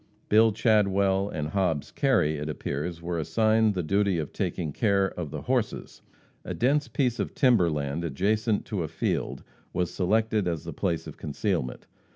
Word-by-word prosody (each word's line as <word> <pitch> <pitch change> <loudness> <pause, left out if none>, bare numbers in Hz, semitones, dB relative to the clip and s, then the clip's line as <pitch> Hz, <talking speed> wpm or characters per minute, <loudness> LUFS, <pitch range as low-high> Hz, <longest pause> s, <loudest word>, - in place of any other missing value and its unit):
Bill 110 +1 +6
Chadwell 100 -3 +2
and 75 -4 -3
Hobbs 85 -5 -1
Kerry, 115 - +2
it 75 +1 -4
appears, 80 +3 -4
were 85 0 -2
assigned 110 +7 +2
the 90 - -1
duty 100 +2 +1
of 75 -3 -4
taking 80 -5 -2
care 100 -1 +2
of 85 -4 -5
the - - -6
horses. - - -2 0.4
A - - -5
dense 140 +4 +2
piece 125 -4 0
of - - -3
timber 120 - +4
land 75 +1 -2
adjacent 105 - 0
to 100 -5 -3
a 80 - -2
field 80 +1 -2 0.3
was 90 -1 -1
selected 110 +1 +1
as 85 -4 -2
the - - -6
place 85 -2 -1
of - - -9
concealment. 80 - -2
95 Hz, 170 wpm, -27 LUFS, 80-110 Hz, 0.4 s, Bill